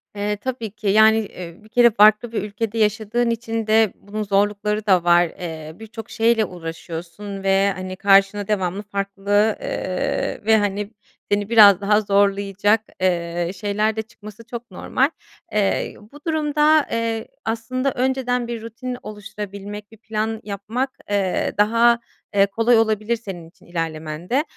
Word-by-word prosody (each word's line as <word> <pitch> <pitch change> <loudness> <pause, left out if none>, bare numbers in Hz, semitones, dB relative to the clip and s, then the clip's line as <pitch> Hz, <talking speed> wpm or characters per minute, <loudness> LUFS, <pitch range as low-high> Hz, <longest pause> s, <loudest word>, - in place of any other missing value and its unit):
Eee, 205 0 -2
tabii 230 -1 -4
ki, 210 0 -6
yani, 220 +2 +6
eee, 185 -4 -6
bir 215 - -18
kere 240 +1 +5
farklı 215 +2 +5
bir 220 - -2
ülkede 210 +2 -4
yaşadığın 220 +2 +1
için 225 -1 -3
de 220 -2 +4
bunun 215 +2 -5
zorlukları 205 +1 0
da 185 -4 +4
var. 175 0 +5
Eee, 160 -2 -7
birçok 225 0 -9
şeyle 225 -1 +2
uğraşıyorsun 175 +3 -7
ve, 195 +1 +3
hani, 185 0 -6
karşına 195 +1 +3
devamlı 195 -1 -1
farklı, 200 -1 -5 0.4
ııı, 225 +2 -3
ve, 220 0 +5
hani, 205 0 -1 0.4
seni 205 0 +1
biraz 205 -4 +7
daha 210 +1 +3
zorlayacak, 200 +1 +2 0.2
eee, 170 -1 0
şeyler 210 +3 0
de 220 - -1
çıkması 215 0 -13
çok 235 0 -8
normal. 265 +3 0 0.4
Eee, 200 -2 0 0.2
bu 290 - -13
durumda, 305 -1 +3
eee, 230 -1 -2 0.2
aslında, 245 +4 -1
önceden 250 -1 0
bir 235 -1 -5
rutin 245 +3 -6
oluşturabilmek, 205 0 -8
bir 225 - -15
plan 220 0 -3
yapmak, 215 +6 -3 0.2
eee, 200 -3 0
daha, 230 +3 +4 0.4
eee, 195 0 +6
kolay 225 +4 +2
olabilir 220 0 +1
senin 185 -7 -8
için - - -24
ilerlemende. 165 - -2
210 Hz, 145 wpm, -21 LUFS, 195-225 Hz, 0.4 s, biraz